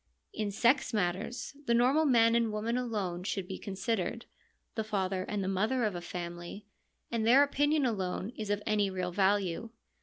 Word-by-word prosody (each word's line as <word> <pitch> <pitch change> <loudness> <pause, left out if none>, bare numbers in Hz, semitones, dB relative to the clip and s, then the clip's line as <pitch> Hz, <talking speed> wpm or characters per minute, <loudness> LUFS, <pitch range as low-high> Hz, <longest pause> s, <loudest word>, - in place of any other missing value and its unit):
In 210 -1 -2
sex 235 +4 +2
matters 200 +8 -2
the 235 - +4
normal 265 +7 +4
man 230 -4 +5
and 230 -1 +2
woman 215 +3 -1
alone 210 -8 -2
should 195 -1 -3
be 190 - -6
considered 225 +3 -2 0.2
— - - -45
the 220 - -2
father 190 -3 -1
and 205 -2 -1
the - - -2
mother 215 +7 +1
of 210 -3 +1
a 175 - -5
family 175 +3 -6 0.2
— - - -46
and 230 -2 0
their 250 +5 +7
opinion 290 +1 +2
alone 195 -2 -2
is 215 -2 -5
of 205 0 0
any 210 -2 +2
real 185 -1 -3
value. 195 +2 +1
210 Hz, 185 wpm, -31 LUFS, 190-235 Hz, 0.2 s, their